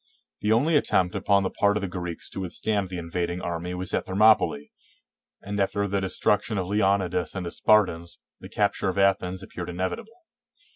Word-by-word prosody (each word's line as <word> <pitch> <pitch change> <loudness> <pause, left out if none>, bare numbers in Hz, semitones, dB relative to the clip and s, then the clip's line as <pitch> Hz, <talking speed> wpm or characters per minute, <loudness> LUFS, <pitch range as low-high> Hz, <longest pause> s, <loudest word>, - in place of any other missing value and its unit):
The 105 - 0
only 140 +9 +3
attempt 90 -10 +2
upon 100 0 +2
the 95 - -2
part 100 0 +2
of - - -3
the 100 - -2
Greeks 90 -2 -5
to - - -6
A^dthstand 100 +1 -2
the 90 - -5
invading 85 +1 -3
army 85 +1 -4
was 90 0 -5
at - - -1
Thermopylae, 95 -7 +3 0.7
and 100 +1 -4
after 100 +1 0
the 100 0 -1
destruction 105 +3 0
of 95 - -1
Leonidas 95 -3 0
and 95 -2 -4
his 85 - -4
Spartans, 90 -6 +2 0.2
the - - -11
capture 100 -1 0
of 95 - -4
Athens 95 -1 +1
appeared 90 -2 -7
ine 90 - -7
vitable. 95 - -5
95 Hz, 185 wpm, -25 LUFS, 90-100 Hz, 0.7 s, only